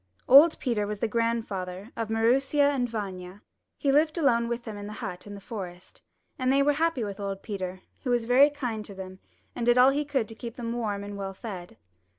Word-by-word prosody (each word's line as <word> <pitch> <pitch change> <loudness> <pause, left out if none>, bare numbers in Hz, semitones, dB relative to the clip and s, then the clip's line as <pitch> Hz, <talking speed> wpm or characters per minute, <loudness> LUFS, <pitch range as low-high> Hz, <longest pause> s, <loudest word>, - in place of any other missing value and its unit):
Old 295 +5 +8
Peter 220 -6 -1
was 210 0 -3
the 230 - 0
grandfather 215 -3 -2
of 225 -2 -3
Maroosia 270 +6 +3
and 245 -3 -1
Vanya. 195 -3 -6 0.3
He 280 - +1
lived 310 +4 +3
alone 235 -7 +2
w^ith 235 0 -3
them 220 -3 -7
in 205 0 -7
the 210 - -7
hut 185 -2 -6
in 205 - -7
the - - -9
forest, 190 -4 -8 0.4
and 255 0 +2
they 275 +1 +4
were 290 +1 +3
happy 320 -4 0
with 200 -1 -5
old 195 -1 -4
Peter, 190 -3 -5 0.2
who 255 - -2
was 240 -2 +1
very 260 +5 +6
kind 245 -7 -4
to 200 - -9
them 185 0 -8 0.4
and 240 - -3
did 240 +1 +4
all 255 +2 +7
he 290 +2 0
could 275 -6 -1
to - - -7
keep 230 +1 -8
them 235 -1 -4
warm 210 -4 -2
and 205 0 -7
well 195 -1 -5
fed. 190 -5 -8
230 Hz, 220 wpm, -27 LUFS, 200-255 Hz, 0.4 s, Old